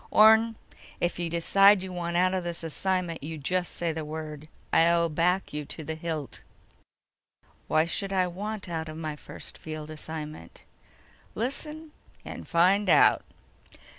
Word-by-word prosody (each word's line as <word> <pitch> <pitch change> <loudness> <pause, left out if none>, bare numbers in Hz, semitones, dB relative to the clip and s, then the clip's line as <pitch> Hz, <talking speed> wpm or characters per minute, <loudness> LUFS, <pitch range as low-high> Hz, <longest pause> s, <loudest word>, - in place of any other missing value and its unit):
"Orne, 220 +1 +6 0.4
if 175 0 -1
you 170 -1 -1
decide 195 +4 +5
you 185 -1 -6
want 170 -1 -2
out 185 +1 +3
of 185 -1 -1
this 170 -1 -5
assignment, 175 +1 -1
you 160 +2 -5
just 180 +5 -1
say 170 -1 0
the 160 0 -4
word. 155 0 -6 0.3
I'll 170 0 +4
back 175 +4 +1
you 150 0 -3
to 160 - -7
the 160 - -4
hilt." 160 -3 -5 1.3
"Why 155 +1 +3
should 195 +3 -2
I 185 -1 +2
want 200 +4 -5
out 160 -2 -4
of 155 - -7
my 155 -2 -4
first - - -10
field 155 -1 -7
assignment?" 155 - -8 0.7
"Listen, 300 +6 -3 0.3
and - - -8
find 185 +4 +3
out." - - +6
170 Hz, 150 wpm, -28 LUFS, 160-190 Hz, 1.3 s, Orne